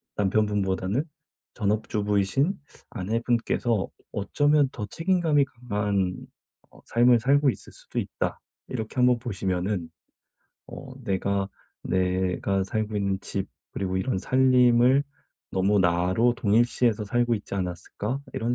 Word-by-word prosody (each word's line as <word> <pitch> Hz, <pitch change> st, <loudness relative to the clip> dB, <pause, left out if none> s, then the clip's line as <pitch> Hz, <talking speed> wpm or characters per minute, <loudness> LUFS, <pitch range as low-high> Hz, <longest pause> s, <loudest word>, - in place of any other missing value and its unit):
'남편분보다는 100 Hz, +2 st, +1 dB, 0.5 s
전업주부이신 105 Hz, -, 0 dB, 0.3 s
아내분께서 115 Hz, 0 st, 0 dB, 0.2 s
어쩌면 145 Hz, +7 st, +2 dB
더 105 Hz, -, -5 dB
책임감이 165 Hz, -, +2 dB
강한 105 Hz, -7 st, -1 dB, 0.6 s
어 -, -, -18 dB
삶을 120 Hz, 0 st, +4 dB
살고 140 Hz, +3 st, +3 dB
있을 -, -, -9 dB
수도 -, -, -5 dB
있다.' -, -, -3 dB, 0.3 s
이렇게 110 Hz, -2 st, -5 dB
한번 125 Hz, -1 st, +4 dB
보시면은 95 Hz, -5 st, -2 dB, 0.8 s
어 135 Hz, -, -9 dB, 0.2 s
'내가 100 Hz, -1 st, 0 dB, 0.3 s
내가 95 Hz, +1 st, 0 dB
살고 110 Hz, +1 st, -2 dB
있는 100 Hz, -1 st, 0 dB
집 -, -, -3 dB, 0.3 s
그리고 95 Hz, -1 st, -2 dB
이런 125 Hz, +2 st, -1 dB
살림을 125 Hz, +2 st, +4 dB, 0.5 s
너무 100 Hz, +2 st, +2 dB
나로 90 Hz, +7 st, +3 dB
동일시해서 115 Hz, 0 st, +2 dB
살고 120 Hz, +3 st, +1 dB
있지 105 Hz, -, -7 dB
않았을까?' 95 Hz, +7 st, -3 dB
이런 120 Hz, +2 st, 0 dB
105 Hz, 270 characters per minute, -26 LUFS, 95-125 Hz, 0.8 s, 삶을